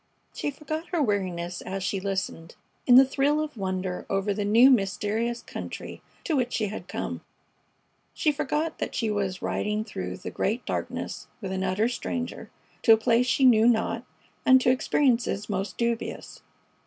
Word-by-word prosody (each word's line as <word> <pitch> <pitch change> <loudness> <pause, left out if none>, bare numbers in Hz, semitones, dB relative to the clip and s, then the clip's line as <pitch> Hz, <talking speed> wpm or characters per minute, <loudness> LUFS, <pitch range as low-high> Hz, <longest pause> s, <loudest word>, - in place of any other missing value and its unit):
She - - -2
forgot 310 +3 -5
her 350 - -1
weariness 185 - -1
as 190 0 -4
she 190 +1 -1
listened, 190 -4 -4 0.3
in 245 - +8
the 265 +1 +9
thrill 280 +3 +1
of 305 -2 -3
wonder 185 -3 -3
over 195 +1 0
the 205 +1 -2
new 230 +6 +6
mysterious 220 +2 0
country - - -7 0.2
to 325 - 0
which 250 -2 0
she 215 -2 0
had 210 - -7
come. - - -4 0.9
She 305 - +2
forgot 305 +2 -2
that - - -3
she 225 -2 0
was 195 -3 -2
riding 210 +1 -1
through 90 - -5
the - - -7
great 225 +5 -1
darkness - - -4
with 195 -4 -5
an 190 0 -2
utter 190 +4 +1
stranger, 245 0 -4 0.3
to 225 - +7
a - - +5
place 235 +2 +2
she 265 +2 +3
knew 230 -2 +6
not, 230 -2 +1 0.4
and 260 0 +7
to 250 - +4
experiences 250 -5 +1
most 195 0 -3
dubious. 235 -1 -3
220 Hz, 165 wpm, -26 LUFS, 195-255 Hz, 0.9 s, the